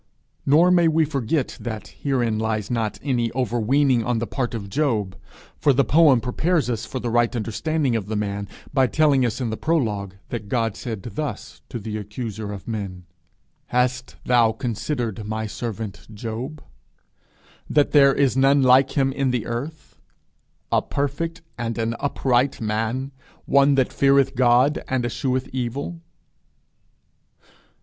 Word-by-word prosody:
Nor 165 +6 +5
may 175 -2 +5
we 160 0 +3
forget 140 -1 -1
that 110 -3 -6
herein 120 -6 -1
lies 110 -1 -2
not 110 -3 -1
any 120 -5 0
overweening 125 +1 +2
on 120 +1 0
the 115 - -1
part 120 -1 -3
of 100 -3 -5
Job, 105 -6 0 0.4
for 145 - +4
the 140 +2 +3
poem 145 -1 +5
prepares 150 +3 0
us 115 -2 -3
for 130 - -4
the 120 -1 -3
right 120 +1 +2
understanding 125 +5 -1
of 105 -3 -2
the 110 - -3
man 100 -1 -2 0.3
by 135 -2 +4
telling 145 -2 +3
us 120 0 -1
in 120 -4 -2
the 110 - -3
prologue, 105 - -1
that 110 -4 -5
God 115 -3 0
said 110 -6 -6
thus 140 +6 -5
to 120 - -4
the 110 -1 -5
accuser 105 0 -5
of 100 -2 -8
men: 100 -5 -5 0.6
'Hast 125 +1 0
thou 120 -2 +4
considered 115 -1 -3
my 110 0 -2
servant 110 -2 -6
Job, 115 +8 -6 1.1
that 145 -1 +3
there 140 -2 +7
is 135 -3 +2
none 135 +1 +4
like 130 +1 +5
him 135 -1 +3
in 135 -1 0
the 125 -3 -1
earth, 140 +7 -6 0.7
a - - +3
perfect 165 +5 -3 0.2
and 115 -1 -3
an 115 0 -1
upright 135 -1 +1
man, 115 +5 -2 0.3
one 140 +1 +4
that 130 -2 +1
feareth 140 -1 +3
God, 125 +3 +3
and 130 -2 0
escheweth 130 +2 -1
evil?' 135 +7 -3
125 Hz, 150 wpm, -23 LUFS, 110-140 Hz, 1.1 s, there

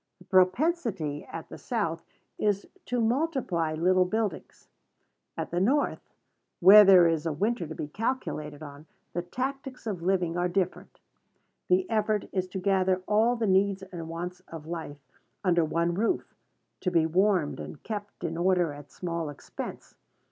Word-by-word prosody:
The - - -18
propensity 190 - +1
at 165 - -8
the - - -9
South 170 -9 -2 0.4
is 205 -1 0 0.2
to 245 - 0
multiply 230 - 0
little 185 +3 +3
buildings. 215 -2 -3 0.7
At - - -4
the 175 - 0
North, 270 +10 +1 0.6
where 200 +4 +10
there 190 -3 +8
is 165 -1 0
a - - 0
winter 195 +3 -1
to 160 - -7
be - - -4
calculated 155 - -3
on, 145 +1 -11 0.3
the 175 - -1
tactics 260 +7 -5
of 200 -6 -3
living 175 -2 +1
are 175 0 +1
different. 185 0 -2 0.7
The 370 0 +3
effort 215 -3 0
is 185 -2 -1
to 185 - -6
gather 190 -1 +1
all 220 +3 +3
the 230 -2 -1
needs 195 0 +2
and 175 -4 -8
wants 175 +2 -5
of 160 -2 -9
life 160 -3 -6 0.5
under 175 -3 +3
one 170 +2 0
roof, 225 - -1 0.5
to 180 - 0
be 165 -3 +3
warmed 180 -2 +2
and 150 - -8
kept 205 -2 -6
in 165 0 -2
order 175 -3 +2
at 145 0 -12
small 170 -3 -4
expense. 145 - -8
185 Hz, 155 wpm, -28 LUFS, 165-210 Hz, 0.7 s, where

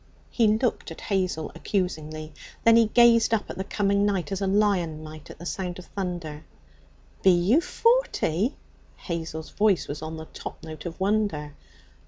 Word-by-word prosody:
He 230 -2 +3
looked 220 +3 +1
at - - -9
Hazel 185 -6 -1
accusingly; 155 -5 -3 0.3
then 230 0 +7
he 230 -1 +6
gazed 230 0 +5
up 215 - -4
at - - -8
the - - 0
coming 200 0 +1
night 200 -3 0
as 195 0 -2
a 195 - +1
lion 190 -6 +1
might 155 -1 -10
at - - -10
the 175 - -10
sound 180 0 -3
of 180 - -10
thunder. 175 -6 -5 0.8
'Be 190 - +5
you 185 - +4
forty?' 355 - +1 0.4
Hazel's 160 -2 -5
voice 205 -3 +2
was 150 +1 -5
on 160 0 -5
the 160 - -7
top - - -9
note 155 +1 -7
of 170 - -8
wonder. 190 -7 0
185 Hz, 170 wpm, -26 LUFS, 160-210 Hz, 0.8 s, then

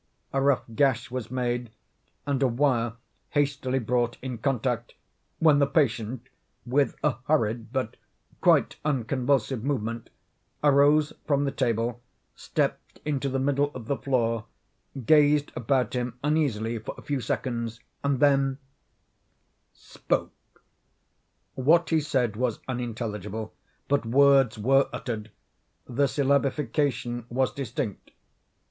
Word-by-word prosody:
A 135 - +1
rough 140 -1 +3
gash 125 -2 +1
was 125 -3 -4
made, 120 -1 -2 0.6
and 140 -2 -1
a 135 - +4
wire 120 -2 +1 0.4
hastily 140 -3 0
brought 120 0 0
in 125 -3 -4
contact, 125 -2 -1 0.4
when 155 -3 +5
the 140 - +4
patient, 125 -4 0 0.4
with 135 +3 +1
a 145 -5 +2
hurried 115 -6 +1
but 130 -4 -2 0.4
quite - - +4
unconvulsive 130 -2 0
movement, 115 -4 -2 0.5
arose 145 +1 +4
from 140 -1 +2
the 140 - 0
table, 120 -2 -1 0.3
stepped - - -2
into 140 -2 -1
the 135 - -1
middle 140 +1 +1
of 125 -3 -7
the 140 - 0
floor, 115 -5 0 0.6
gazed 150 0 +4
about 125 -1 0
him 125 -1 -3
uneasily 120 -7 0
for 110 - -7
a - - -11
few 140 -3 -2
seconds, 115 -1 -3 0.2
and 140 -2 +1
then—spoke. 135 -1 -3 1.2
What 165 +6 +3
he 160 -1 +3
said 125 -7 0
was 120 -1 -1
unintelligible, 110 -4 -4 0.3
but 140 -4 +1
words 135 -1 +5
were 135 +6 +3
uttered; 110 -3 -5 0.6
the 140 +3 +1
syllabification 135 -3 0
was 130 +1 0
distinct. 120 -5 -4
130 Hz, 115 wpm, -26 LUFS, 115-140 Hz, 1.2 s, when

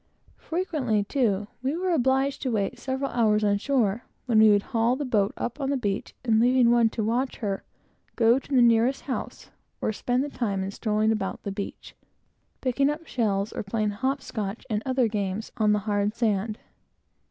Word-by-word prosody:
Frequently, 300 - -1
too, 210 -4 0 0.2
we 270 +5 -1
were 370 +1 0
obliged 270 -2 +1
to 260 - -1
wait 205 -4 -1
several 265 +1 -2
hours 215 -3 +2
on 205 -1 +2
shore; 235 -3 0 0.2
when 230 -4 +3
we 220 0 +7
would 205 -1 +4
haul 230 +2 +3
the 290 +2 -3
boat 210 -5 +1
up 245 +5 -4
on 270 - -1
the 280 - +1
beach, 205 -5 -3
and 220 -2 +3
leaving 245 0 +4
one 235 -1 +4
to 220 - -3
watch 245 +4 0
her, 200 -4 -3 0.5
go 230 0 +5
up - - -3
to 280 - -4
the 250 - +6
nearest 235 +3 +3
house, 260 - -5 0.3
or 220 - -1
spend 245 +4 0
the 290 - -4
time 200 -8 -2
in 195 - -4
strolling 215 +1 +1
about 215 -3 -3
the 200 - -3
beach, 200 0 -7 0.7
picking 275 +2 +2
up 305 +3 -4
shells, 205 -6 -1
or - - -3
playing 210 +1 -1
hopscotch, 225 -3 -3
and 210 0 0
other 255 -2 +2
games, 205 0 -3
on 215 -2 +3
the 210 - +3
hard 205 0 0
sand. 215 -2 0
230 Hz, 190 wpm, -26 LUFS, 210-260 Hz, 0.7 s, we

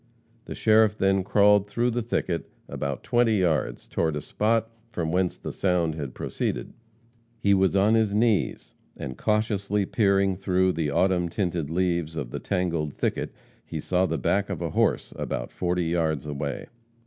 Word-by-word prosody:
The - - -6
sheriff 110 -1 +4
then 95 0 +2
crawled 105 +1 +4
through 120 +4 +1
the 120 +1 -1
thicket 95 -6 -2 0.2
about 70 -1 -4
twenty 120 -2 +2
yards 85 -5 0
toward 80 -2 -1
the 75 - -3
spot 115 +5 0 0.2
from 80 -6 -2
whence 90 0 0
the - - -6
sound 90 -4 +1
had 70 -5 -6
proceeded. - - -3 0.6
He 100 -3 +3
was 95 0 +3
on 100 +3 +4
his 110 -2 +3
knees, 105 -1 +1 0.2
and, 65 - -5
cautiously 105 - 0
peering 100 -2 +2
through 95 -1 +1
the 80 -2 -1
autumn 90 +3 +2
tinted 85 -5 -2
leaves 85 -2 0
of 65 -6 -4
the - - -4
tangled 85 -6 -1
thicket, - - -2 0.3
he 80 - -6
saw 90 +4 +1
the - - -1
back - - 0
of - - -3
a - - -3
horse, - - +1
about - - -4
forty 90 -1 -1
yards 80 -3 0
away. 70 -1 -4
95 Hz, 165 wpm, -26 LUFS, 80-105 Hz, 0.6 s, sheriff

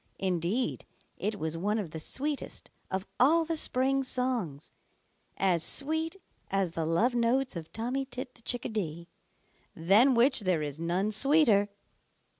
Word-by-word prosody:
Indeed 190 +6 -1 0.3
it 210 0 -2
was 160 -2 -3
one 210 +4 0
of 195 -8 -4
the 160 - -6
sweetest 285 - -4 0.2
of 190 +1 -3
all 320 +6 +4
the 330 +1 -2
spring 270 -2 +1
songs, 245 - -1 0.7
as 180 -4 +2
sweet 320 +4 +1 0.3
as 195 -3 0
the 165 -1 -3
love 220 +10 +2
notes 245 +2 +1
of 160 -2 -7
Tommy 250 +5 -2
Tit 250 0 -7
the 230 - -17
Chickadee, 190 -9 -3 0.7
than 210 +11 +5
which 255 +3 +4
there 185 -6 0
is 145 0 -5
none 180 +5 0
sweeter. 225 -4 +3
215 Hz, 140 wpm, -29 LUFS, 175-260 Hz, 0.7 s, than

